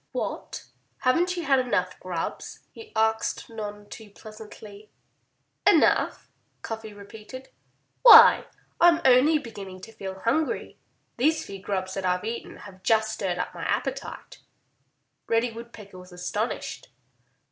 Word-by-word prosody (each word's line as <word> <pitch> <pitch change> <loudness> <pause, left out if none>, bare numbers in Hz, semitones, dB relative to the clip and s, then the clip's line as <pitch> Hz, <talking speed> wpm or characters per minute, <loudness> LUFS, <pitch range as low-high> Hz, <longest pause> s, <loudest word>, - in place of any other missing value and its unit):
"What! - - -5 0.4
Haven't 345 +8 +1
you 345 - -3
had 275 -3 +3
enough 185 -8 -1
grubs?" 180 -3 -5
he 445 -1 -13
asked 220 +1 0
none 205 -2 -7
too 215 0 -11
pleasantly. 215 0 -13 0.8
"Enough!" - - +3 0.4
Cuffy 220 -1 -6
repeated. 215 +5 -11 0.5
"Why, 470 -3 +9 0.3
I'm 340 -1 +6
only 265 +5 +5
beginning 200 -8 -9
to 225 - -11
feel 190 -3 -8
hungry. 310 +7 -1 0.4
These 305 +6 +1
few 195 -1 -9
grubs 190 -1 -3
that 195 - -4
I've 180 +2 0
eaten 230 +1 -6
have 190 -2 -13
just 220 +2 +1
stirred 180 -3 -3
up - - -4
my - - -9
appetite."' - - -4 0.9
Reddy 230 +1 +1
Woodpecker 225 -4 -11
was 180 0 -14
astonished. 205 +6 -4
220 Hz, 125 wpm, -25 LUFS, 195-250 Hz, 0.9 s, Why